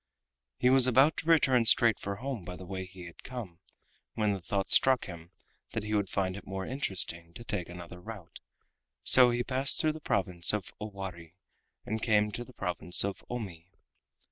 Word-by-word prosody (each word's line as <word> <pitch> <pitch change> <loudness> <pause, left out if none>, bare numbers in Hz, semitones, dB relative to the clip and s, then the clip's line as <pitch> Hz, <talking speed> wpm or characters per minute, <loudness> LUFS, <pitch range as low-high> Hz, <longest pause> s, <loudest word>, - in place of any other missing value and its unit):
He 125 - +3
was 130 -1 +6
about 135 +5 +4
to 165 - -5
return 130 -7 +4
straight 115 -1 +4
for 100 0 -4
home 125 -2 -5
by 90 +1 -7
the 95 - -10
way 95 0 -5
he 90 -1 -12
had 85 - -12
come, 110 -10 -8 0.6
when 105 -2 +1
the 95 - -5
thought 100 +2 -2
struck 130 -2 +5
him 85 -1 -10 0.4
that 110 - -3
he 105 0 -4
would 100 -3 0
find 95 -1 -1
it 100 - -10
more 95 0 -4
interesting 90 -9 -1
to 120 - -9
take 100 -7 -4
another 90 0 -10
route, 100 -4 -10 0.6
so 125 -1 +7
he 120 0 0
passed 130 +2 +2
through 155 -1 +1
the 155 - -10
province 90 - +1
of 105 -5 -4
Owari 95 -5 -7 0.5
and 110 +1 -3
came 105 -2 +2
to 120 - -4
the 125 - -15
province 90 -5 +2
of 100 - -5
Omi. 95 -8 -6
100 Hz, 190 wpm, -30 LUFS, 90-120 Hz, 0.6 s, so